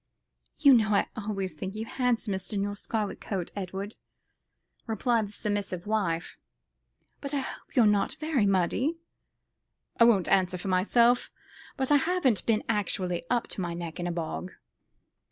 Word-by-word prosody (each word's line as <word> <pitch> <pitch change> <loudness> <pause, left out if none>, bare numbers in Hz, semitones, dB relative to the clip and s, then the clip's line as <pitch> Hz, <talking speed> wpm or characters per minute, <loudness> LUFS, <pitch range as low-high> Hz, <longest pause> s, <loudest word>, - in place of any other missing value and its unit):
"You 280 -3 +7
know 215 -3 +4
I - - +3
always 200 -3 -3
think 190 +1 -6
you 220 +1 -4
handsomest 225 -7 -1
in 200 -1 0
your 205 0 -3
scarlet 210 0 -3
coat, 185 -4 -3
Edward," 195 +2 -5 0.9
replied 225 0 +1
the - - -13
submissive 205 -4 -2
wife, 195 -6 -1 0.8
"but 280 0 -4
I 275 - +1
hope - - -9
you're 240 - +6
not 205 -1 +2
very 295 -9 +1
muddy." 195 - +1 1.0
"I 230 - +8
won't 210 -6 +4
answer 185 -1 +2
for 190 - -5
myself; 235 +6 +3 0.5
but 265 0 0
I 290 - +7
haven't 320 - +1
been 220 -2 +2
actually 185 -5 -1
up 240 -1 +1
to - - -4
my 170 -1 -3
neck 170 -1 -6
in 175 - -2
a - - -1
bog." 170 +2 -4
205 Hz, 155 wpm, -28 LUFS, 185-235 Hz, 1.0 s, I